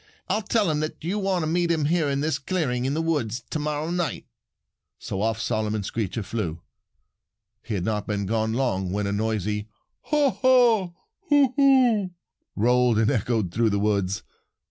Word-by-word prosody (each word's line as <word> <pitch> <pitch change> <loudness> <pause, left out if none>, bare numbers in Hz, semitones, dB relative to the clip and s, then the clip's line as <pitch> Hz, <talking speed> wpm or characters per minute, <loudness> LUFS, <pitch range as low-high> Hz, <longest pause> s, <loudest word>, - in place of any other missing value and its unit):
I'll 210 +3 0
tell 210 -3 +1
him 150 - 0
that 155 0 -4
you 190 +6 -1
want 190 -3 0
him 155 - -1
to - - -1
meet 175 -1 +1
you 160 -3 +1
here 160 0 +1
in 140 0 -1
this 150 -2 0
clearing 135 -6 -1
in 135 +2 0
the 160 - 0
woods 130 -8 -1
to 155 - -1
morrow 150 +2 -2
night." 175 -2 -2 0.7
So 95 - -5
off 110 +1 0
Simon 110 -3 -1
Screecher 110 +1 -3
flew. 85 -7 -4 1.0
He 110 - -4
had 90 - -2
not 105 -2 -2
been 100 -1 -1
gone 110 +2 0
long 105 -8 -1
when 105 +1 -1
a 100 - -1
noisy 105 0 -2 0.4
"haw 295 -3 +2
haw 235 -9 +3 0.4
hoo 285 -4 +4
hoo" 255 -8 +4 0.5
rolled 120 +1 +3
and 110 +2 +3
echoed 110 -6 0
through 115 +4 +2
the 100 - 0
woods. 100 -2 0
125 Hz, 180 wpm, -25 LUFS, 105-175 Hz, 1.0 s, hoo